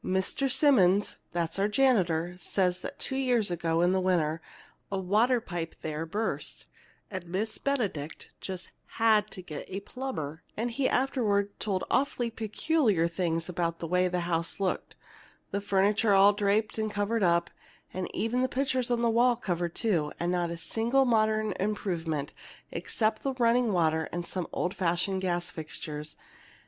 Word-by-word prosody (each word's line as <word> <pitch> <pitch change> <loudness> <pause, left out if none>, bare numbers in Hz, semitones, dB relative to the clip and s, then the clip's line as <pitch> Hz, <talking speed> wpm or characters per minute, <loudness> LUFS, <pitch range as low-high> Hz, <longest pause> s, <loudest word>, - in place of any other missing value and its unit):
"Mr. 190 +9 0
Simmonds 205 - +4
(that's 170 +2 -2
our 200 - +3
janitor) 180 -9 +2
says 180 -1 0
that 280 - -7
two 265 - -2
years 245 -7 +2
ago, 165 -1 0
in 175 +1 +4
the 190 0 +2
winter, 165 -4 +1 0.5
a 195 - 0
water 215 +7 +3
pipe 175 -6 -5
there 155 +1 -3
burst, 215 +7 -3 0.5
and 185 -3 -5
Miss 210 +5 -2
Benedict 205 - -2
just 185 -2 -6 0.3
had 215 -2 +4
to 185 - -8
get 150 -4 -7
a 190 - -3
plumber; 165 - -5 0.2
and 235 +2 -1
he 260 +2 +1
afterward 210 -7 +1
told 195 -3 -1
awfully 255 -3 +1
peculiar 220 - +1
things 165 -1 -1
about 170 -2 -1
the 165 - -5
way 180 +2 +2
the 180 0 -1
house 170 0 -1
looked, 190 -2 -2 0.6
the 200 - -1
furniture 200 +2 +3
all 200 +1 +7
draped 205 +2 +1
and 215 0 0
covered 210 +2 -1
up, 170 -2 +2 0.4
and 185 0 -3
even 235 +3 0
the 255 - +1
pictures 260 -2 0
on 240 -1 +1
the - - +4
walls 240 +1 +4
covered, 175 -2 -1
too, 170 -10 +1
and 175 +1 0
not 175 -1 0
a 170 - -4
single 235 +9 +1
modern 215 -2 +2
improvement 175 -7 -2 0.4
except 215 -1 -1
the 270 - -1
running 240 -1 +3
water 160 -3 +1
and 175 0 -3
some 180 -1 -3
old 180 - -1
fashioned 185 +1 0
gas 175 -1 -1
fixtures. 155 -1 -6
195 Hz, 160 wpm, -29 LUFS, 170-225 Hz, 0.6 s, all